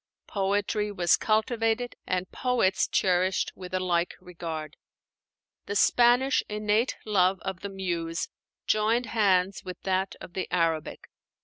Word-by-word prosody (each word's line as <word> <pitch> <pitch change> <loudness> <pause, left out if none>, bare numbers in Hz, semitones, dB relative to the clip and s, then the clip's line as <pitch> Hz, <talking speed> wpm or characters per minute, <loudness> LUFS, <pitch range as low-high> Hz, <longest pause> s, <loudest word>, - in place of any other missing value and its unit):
Poetry 205 +1 0
was 180 -3 +3
cultivated 225 +2 0
and 185 0 -2
poets 250 -7 +1
cherished 185 0 +1
with 180 -1 -9
a 185 - 0
like 175 -1 0
regard: 165 -3 -6 0.9
the 205 - -3
Spanish 245 +5 +4
innate 210 +3 0
love 190 -3 +3
of 190 -2 -4
the 200 - -5
Muse 175 -4 -3 0.4
joined 225 +3 +2
hands 195 -4 +2
with 185 -1 -7
that 190 0 -1
of 175 - -11
the 190 - -3
Arabic. 165 -3 -1
190 Hz, 125 wpm, -27 LUFS, 180-215 Hz, 0.9 s, Spanish